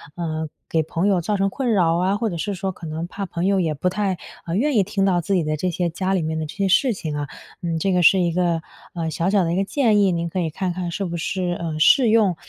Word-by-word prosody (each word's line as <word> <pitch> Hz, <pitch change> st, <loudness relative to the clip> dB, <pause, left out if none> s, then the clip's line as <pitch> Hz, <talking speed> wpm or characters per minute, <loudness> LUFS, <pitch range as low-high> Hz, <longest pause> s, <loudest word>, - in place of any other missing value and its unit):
呃， 160 Hz, -2 st, -3 dB, 0.2 s
给 160 Hz, -1 st, +1 dB
朋 165 Hz, +4 st, -1 dB
友 190 Hz, -3 st, +2 dB
造 205 Hz, +4 st, -1 dB
成 195 Hz, 0 st, +1 dB
困 250 Hz, +4 st, -1 dB
扰 175 Hz, -6 st, +3 dB
啊， 190 Hz, +3 st, +1 dB
或 225 Hz, 0 st, -1 dB
者 175 Hz, -, -4 dB
是 205 Hz, +5 st, -2 dB
说 190 Hz, +1 st, -2 dB
可 180 Hz, -, -11 dB
能 160 Hz, +2 st, -4 dB
怕 195 Hz, +2 st, -5 dB
朋 175 Hz, -1 st, -3 dB
友 195 Hz, 0 st, +3 dB
也 165 Hz, -4 st, 0 dB
不 150 Hz, +5 st, -2 dB
太， 195 Hz, -1 st, -1 dB, 0.3 s
呃， 165 Hz, -, -2 dB
愿 285 Hz, +5 st, +1 dB
意 205 Hz, -, +5 dB
听 195 Hz, 0 st, 0 dB
到 180 Hz, -3 st, +2 dB
自 195 Hz, -, -2 dB
己 175 Hz, -, +2 dB
的 155 Hz, 0 st, -1 dB
这 180 Hz, +4 st, -1 dB
些 175 Hz, +1 st, -1 dB
家 185 Hz, +3 st, -2 dB
里 190 Hz, -, +1 dB
面 160 Hz, 0 st, -2 dB
的 160 Hz, -, -2 dB
这 150 Hz, -, -9 dB
些 195 Hz, -1 st, 0 dB
事 240 Hz, +7 st, +4 dB
情 155 Hz, -6 st, -5 dB
啊。 145 Hz, -1 st, -3 dB, 0.3 s
嗯， 170 Hz, -2 st, -1 dB
这 195 Hz, +4 st, +1 dB
个 180 Hz, -, +3 dB
是 190 Hz, +3 st, +6 dB
一 175 Hz, -2 st, +1 dB
个， 170 Hz, -1 st, +1 dB, 0.3 s
呃， 165 Hz, -2 st, -2 dB
小 170 Hz, +3 st, 0 dB
小 200 Hz, -1 st, +3 dB
的 165 Hz, 0 st, 0 dB
一 -, -, 0 dB
个 195 Hz, -, +2 dB
建 220 Hz, -1 st, +2 dB
议， 195 Hz, -2 st, +4 dB
您 170 Hz, -1 st, -1 dB
可 185 Hz, -, -3 dB
以 170 Hz, -2 st, 0 dB
看 180 Hz, +3 st, -3 dB
看 175 Hz, -1 st, -4 dB
是 195 Hz, +3 st, -3 dB
不 175 Hz, -1 st, -4 dB
是， 175 Hz, +1 st, -2 dB
呃， 160 Hz, -2 st, -3 dB
适 245 Hz, -, +6 dB
用。 215 Hz, -5 st, +4 dB
180 Hz, 310 characters per minute, -22 LUFS, 165-195 Hz, 0.3 s, 是